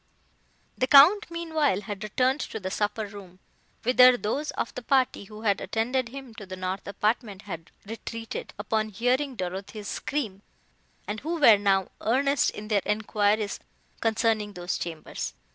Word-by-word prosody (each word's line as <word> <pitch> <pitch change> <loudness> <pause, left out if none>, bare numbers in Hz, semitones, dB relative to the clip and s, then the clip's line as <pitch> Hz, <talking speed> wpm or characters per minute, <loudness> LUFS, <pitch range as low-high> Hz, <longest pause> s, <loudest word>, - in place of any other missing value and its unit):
The 255 - +2
Count, 330 +11 +7
meanwhile, 320 - 0
had 205 0 -6
returned 255 +6 +1
to 220 - -4
the 190 -2 -4
supper 210 +2 -1
room, 200 -3 -11 0.5
whither 250 +1 +7
those 270 +8 -2
of - - -3
the 250 - -6
party 260 -4 +1
who 215 +2 -11
had 200 -3 +2
attended 235 +4 -1
him 265 -2 -9
to 205 -4 -8
the 185 - -6
north 185 +1 -4
apartment 210 0 -1
had 170 -5 -7 0.2
retreated, 225 +1 -6
upon 215 +1 -1
hearing 250 +5 0
Dorothée's 195 +3 -5
scream, 220 -10 -3 0.7
and 210 +1 -3
who 330 +5 -3
were 225 -8 +7
now 195 -2 +2
earnest 275 +3 +2
in 210 - -8
their 205 -2 +3
enquiries 210 0 0 0.4
concerning 220 -2 +1
those 175 -1 -3
chambers. 165 -2 -5
220 Hz, 150 wpm, -27 LUFS, 200-255 Hz, 0.7 s, Count